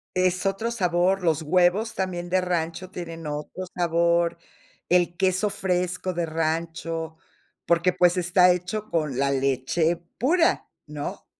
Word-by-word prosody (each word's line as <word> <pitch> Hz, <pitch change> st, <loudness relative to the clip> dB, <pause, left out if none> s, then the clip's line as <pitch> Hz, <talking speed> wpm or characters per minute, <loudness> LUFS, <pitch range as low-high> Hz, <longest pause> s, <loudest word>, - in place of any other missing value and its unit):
Es 185 Hz, +1 st, +1 dB
otro 195 Hz, +4 st, 0 dB
sabor, 185 Hz, -3 st, +1 dB
los 160 Hz, -3 st, +2 dB
huevos 180 Hz, +7 st, +2 dB
también 175 Hz, -2 st, -3 dB
de 185 Hz, -, +3 dB
rancho 180 Hz, 0 st, -2 dB
tienen 165 Hz, -2 st, -7 dB
otro 150 Hz, +5 st, -5 dB
sabor, 170 Hz, 0 st, +2 dB, 0.5 s
el 175 Hz, -1 st, +2 dB
queso 190 Hz, +2 st, +1 dB
fresco 180 Hz, -1 st, -1 dB
de 170 Hz, -1 st, -2 dB
rancho, 165 Hz, 0 st, -3 dB, 0.5 s
porque, 170 Hz, +2 st, +2 dB
pues, 180 Hz, +1 st, +3 dB
está 180 Hz, +1 st, +4 dB
hecho 190 Hz, +5 st, -3 dB
con 150 Hz, -6 st, -1 dB
la 140 Hz, 0 st, +1 dB
leche 135 Hz, +5 st, +1 dB, 0.2 s
pura, 330 Hz, +7 st, +2 dB, 0.2 s
¿no? 150 Hz, -1 st, -6 dB
175 Hz, 130 wpm, -25 LUFS, 165-185 Hz, 0.5 s, está